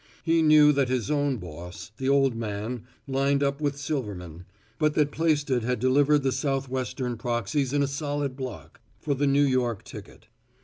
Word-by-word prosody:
He 165 0 +3
knew 155 -1 +7
that 140 -3 +1
his 130 +2 -1
own 145 -3 +1
boss, 90 +1 -9
the 135 0 -1
old 135 -3 +3
man, 110 +2 -4 0.2
lined 140 +1 +1
up 140 +1 -1
with 145 -1 -1
Silverman, 100 - -5 0.3
but 150 -1 +2
that 150 -1 +2
Plaisted 145 -6 +1
had 125 +1 -1
delivered 140 +3 +3
the 135 - +1
south 135 +1 -1
western 125 -1 -3
proxies 120 +3 -1
in 145 0 +2
a - - +1
solid 145 -1 -3
block, 130 -4 -8 0.2
for 145 - -1
the 140 +1 0
New 140 +1 +4
York 125 -6 0
ticket. - - -12
135 Hz, 175 wpm, -26 LUFS, 120-145 Hz, 0.3 s, knew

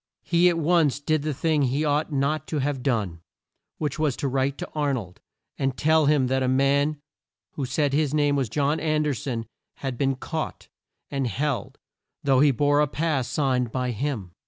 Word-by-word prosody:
He 175 +1 +4
at 170 - 0
once 160 -4 +2
did 155 +1 0
the 155 +1 -2
thing 150 +2 +1
he 140 +3 +1
ought 150 +2 0
not 145 +2 0
to 155 - -2
have 140 -1 -1
done, 105 -11 -1 0.6
which 150 0 -3
was 150 -5 +1
to 140 - -2
write 135 +1 0
to - - -5
Ar 150 -2 0
nold, 95 -8 -7 0.4
and 135 -1 -1
tell 155 0 +3
him 145 -3 +4
that 130 +1 0
a 130 - +1
man 140 +3 +2 0.5
who 135 -3 -4
said 145 +1 0
his 150 -1 +2
name 145 -1 +2
was 135 -5 0
John 145 +5 +1
An 155 -1 +1
derson 125 -5 -2 0.3
had 130 -3 -5
been 135 -1 +1
caught, 160 +4 -5 0.4
and 135 -2 -1
held, 130 0 -2 0.5
though 135 -2 +3
he 145 +2 +6
bore 145 +3 +3
a 150 - +3
pass 145 -4 -1
signed 130 -3 0
by 125 0 -1
him. 115 -6 -3
140 Hz, 190 wpm, -25 LUFS, 130-150 Hz, 0.6 s, he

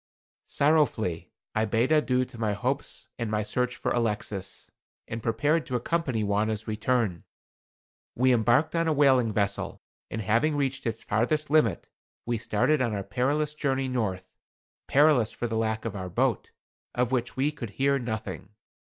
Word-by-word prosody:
Sorrowfully 110 - +1 0.2
I 110 0 +1
bade 115 +5 +1
adieu 130 -4 +3
to 120 -2 -13
my 110 -2 0
hopes 130 +7 -3
and 115 -2 -2
my 105 0 0
search 125 +3 -1
for - - -2
Alexis, 105 -4 -2 0.4
and 115 +1 -5
prepared 145 +9 +1
to 130 - -2
accompany 130 -3 0
Wauna's 105 +2 0
return. 110 -4 0 0.9
We 130 +1 +4
embarked 120 +6 +3
on 165 0 +1
a 160 - +3
whaling 130 -5 +4
vessel, 100 -1 -1 0.3
and 110 - -4
having 115 +9 +2
reached 135 -3 -1
its 115 0 -3
farthest 145 +8 0
limit, 120 - +2 0.3
we 120 -1 -1
started 130 +8 +1
on 115 -4 0
our 100 - -3
perilous 140 +8 0
journey 135 -3 -1
north; 95 -7 -3 0.5
perilous 140 -6 +4
for - - -4
the 115 -1 -2
lack 110 0 -1
of 110 -3 -3
our 95 -2 -5
boat, - - 0 0.5
of 125 0 +1
which 120 -2 -1
we 140 +3 +2
could 140 -7 -7
hear 140 0 +2
nothing. 110 -5 -5
120 Hz, 160 wpm, -27 LUFS, 110-135 Hz, 0.9 s, We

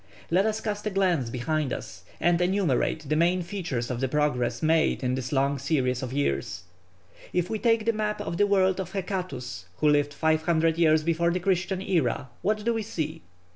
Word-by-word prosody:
Let 190 +5 +3
us 220 0 -1
cast 210 -1 -3
a - - +2
glance 180 - +1
behind 145 +4 -1
us 95 +1 -6 0.2
and 175 0 +2
enumerate 175 -5 +1
the 155 - +1
main 175 +3 +2
features 165 -10 -3
of 120 - -3
the 135 - 0
progress 145 -2 0
made 160 -2 +2
in 125 0 +1
this 130 -1 -3
long 140 0 +1
series 130 -3 0
of 130 -2 -4
years. 130 -9 -1 0.7
If 180 -1 0
we 220 - -1
take 225 -1 +2
the 230 - +2
map 210 0 -2
of 170 - -4
the 205 - +3
world 190 -1 +3
of 190 -1 -5
Hecatæus, 155 - -4
who 150 - +2
lived 145 0 +2
500 160 +1 +2
years 155 -2 +4
before 170 +1 +1
the 180 +1 0
Christian 185 0 0
era, 155 -9 0
what 215 +1 0
do 235 - +2
we 225 - -1
see? 165 -6 -4
165 Hz, 195 wpm, -26 LUFS, 140-190 Hz, 0.7 s, years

